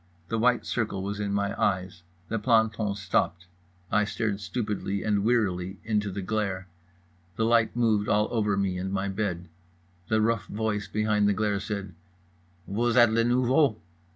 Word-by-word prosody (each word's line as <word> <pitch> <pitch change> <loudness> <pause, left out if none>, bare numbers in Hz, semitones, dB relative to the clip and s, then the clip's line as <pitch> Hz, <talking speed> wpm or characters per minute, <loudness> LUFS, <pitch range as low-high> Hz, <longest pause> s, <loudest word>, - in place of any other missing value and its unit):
The 115 - -1
white 125 +2 +2
circle 105 -5 -2
was 100 +1 -4
in 100 -1 -2
my 100 0 0
eyes. 95 -2 0 0.3
The 115 - -2
planton 110 -2 +2
stopped. 90 -2 -1 0.5
I 105 - +3
stared 105 -1 -2
stupidly 105 -3 -3
and 105 -2 +1
wearily 95 -5 0
into 105 -2 0
the 100 0 -5
glare. 100 -2 -2 0.7
The 110 - +1
light 115 -1 +3
moved 110 -4 +2
all 105 +1 +3
over 105 -4 +1
me 95 -2 0
and 95 +1 -3
my 100 0 -1
bed. 95 -3 -3 0.6
The 110 - +2
rough 115 0 +1
voice 105 -1 -2
behind 105 0 +1
the - - +3
glare 105 -1 0
said: 100 -2 -5 0.7
"_Vous 115 +4 0
êtes 120 -2 +6
le 115 +1 +3
nouveau? 125 +1 +3
105 Hz, 160 wpm, -27 LUFS, 100-110 Hz, 0.7 s, êtes